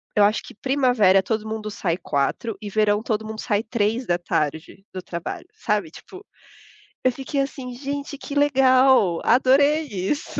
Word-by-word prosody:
Eu 210 - +5
acho 210 +2 +2
que - - -12
primavera 245 -7 +3
todo 220 +1 -2
mundo 215 -1 -5
sai 175 -4 -2
16h 170 +7 -2
e 210 - -6
verão 210 0 +2
todo 220 -1 -2
mundo 220 0 -7
sai 210 -2 0
15h, 195 - -2
do 185 - -5
trabalho, 170 -1 -6
sabe, 205 -7 -2
tipo, 380 - -13 0.8
eu 255 - +3
fiquei 270 +2 -3
assim, 260 -2 -5
gente, 280 +2 -5
que 285 +1 -8
legal, 260 -9 +4
adorei 280 +5 +4
isso. 205 +7 -3
220 Hz, 150 wpm, -23 LUFS, 200-265 Hz, 0.8 s, Eu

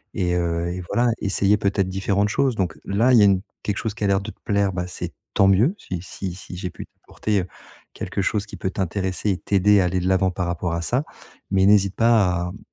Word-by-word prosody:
et 90 -1 0
heu, 85 0 -1
et 90 - -5
voilà, 120 0 +2
essayer 100 +1 +2
peut-être 100 -2 0
différentes 100 +2 0
choses, 130 +3 +1
donc 90 -6 -1
heu, - - -22
là, 115 +6 +2
il 120 - +7
y - - +6
a - - +7
une 95 -2 +3 0.2
quelque 105 -1 -2
chose 110 -3 -3
qui 105 - -6
a - - +3
l'air 100 0 +2
de 105 +2 -6
te - - -22
plaire, 100 -2 +1
bah, 90 -1 -3
c'est - - -6 0.2
tant 100 - +5
mieux, 110 - +4
si 90 - -6
si 95 0 -6
si 95 -1 -10
j'ai 90 0 -4
pu - - -9
t'apporter, 105 -2 -3
heu, 90 - -7 0.5
quelque - - -3
chose 105 +2 0
qui - - -9
peut 95 - -3
t'intéresser 95 +2 -2
et 90 - -1
t'aider 100 0 +3
à 90 - +2
aller 90 +1 0
de 90 - -2
l'avant 95 0 +2
par 90 -1 -3
rapport 85 0 -2
à 85 - -2
ça, 125 - 0 0.5
mais 95 -1 +3
n'hésite 100 -1 +4
pas 105 -7 +3
à, 90 - -5
mmh, 100 - -10
95 Hz, 255 wpm, -23 LUFS, 90-105 Hz, 0.5 s, il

